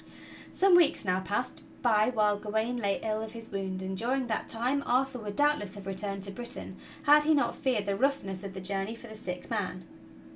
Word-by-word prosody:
Some 380 -1 +5
weeks 330 -8 +4
now 185 0 +2
passed 205 +6 -3 0.2
by 220 -2 +4
while 210 -4 +3
Gawain 220 +4 -1
lay 200 -4 0
ill 215 0 -1
of 220 0 -6
his 230 -1 -8
wound, 190 -1 -3
and 190 0 -3
during 255 +6 0
that 220 -2 -2
time 250 +5 0
Arthur 255 +1 +1
would 205 -2 -6
doubtless 290 -10 +1
have 200 -1 -9
returned 195 0 -4
to 200 - -5
Bri 240 +4 -6
tain - - -8 0.3
had 300 0 +7
he 310 +1 +4
net 285 - +2
feared 250 -7 0
the 200 0 0
roughness 205 -6 0
of 195 -1 -6
the 190 - -5
journey 195 +3 -2
for - - -12
the 220 - -9
sick 180 -4 -5
man. 185 -5 -2
215 Hz, 215 wpm, -30 LUFS, 195-250 Hz, 0.3 s, had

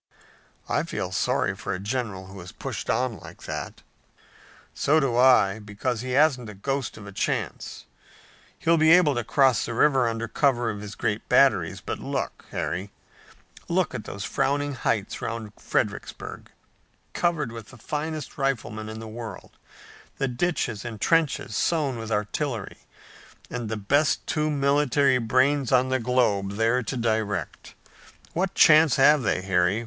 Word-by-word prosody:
"I - - +1
feel - - -4
sorry - - 0
for 100 - -4
a - - -6
general 105 -3 -3
who 95 0 -10
is 90 - -10
pushed - - -6
on 125 -5 0
like - - -13
that." - - -6 0.9
"So 155 +3 +3
do 135 -5 0
I, 120 -5 +5
because 110 +3 -3
he 130 0 -4
hasn't 130 -5 +3
a 105 - -9
ghost 135 +5 -3
of 105 - -10
a 100 - -9
chance. 100 - -3 0.7
He'll 165 0 +2
be 155 0 +5
able 175 -5 +5
to 120 -2 -2
cross 130 0 +3
the 115 - -4
river 135 -1 +4
under 115 0 -2
cover 120 -1 +1
of 105 -1 -7
his 105 0 -8
great - - -2
batteries, - - +3
but - - -5
look, - - -4
Harry, 95 +4 -3 0.8
look 175 -2 +1
at 120 -4 -5
those 100 0 -6
frowning 145 +6 0
heights 110 -5 -2
around 110 -2 -5
Fredericksburg, - - -3 0.6
covered 165 -8 0
with 115 -2 -9
the 130 - -14
finest 150 +3 -5
riflemen 110 -5 -2
in 110 0 -7
the 110 - -8
world, 115 0 -8 0.7
the 135 - 0
ditches 125 - -1
and 115 -3 -6
trenches 160 -9 +1
sown 145 -6 0
with 115 0 -6
artillery, 110 +2 -2 0.7
and 120 -3 -4
the 110 - -2
best 140 +9 +1
two 155 0 0
military 140 -2 +2
brains 130 +3 +2
on 130 0 +4
the 130 0 +1
globe 110 -5 +1
there 115 +4 +2
to 125 +2 -4
direct. 110 - -2 0.6
What 185 +2 -1
chance 155 -2 +6
have 145 +2 +5
they, 100 -5 0
Harry? 95 +2 +2
120 Hz, 155 wpm, -25 LUFS, 110-140 Hz, 0.9 s, chance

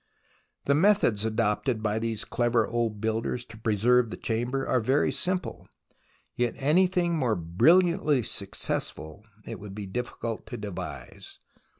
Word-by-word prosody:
The 140 - +3
methods 150 - +3
adopted 110 +1 0
by 105 0 0
these 115 -1 -2
clever 120 -2 +1
old 115 -3 -1
builders 115 +2 -1
to 115 - -13
preserve 115 +2 +3
the - - -6
Chamber 120 +4 -2
are 130 - +2
very 130 +6 +2
simple, 185 0 -3 0.7
yet 120 -1 0
any 155 +7 +4
thing 175 -2 0
more 125 -8 +1
brilliantly 150 - +3
successful 80 -2 -3 0.2
it - - -7
would 100 -1 -9
be 105 -1 -5
difficult 115 +1 -5
to - - -6
devise. 105 -4 -7
115 Hz, 135 wpm, -27 LUFS, 110-135 Hz, 0.7 s, any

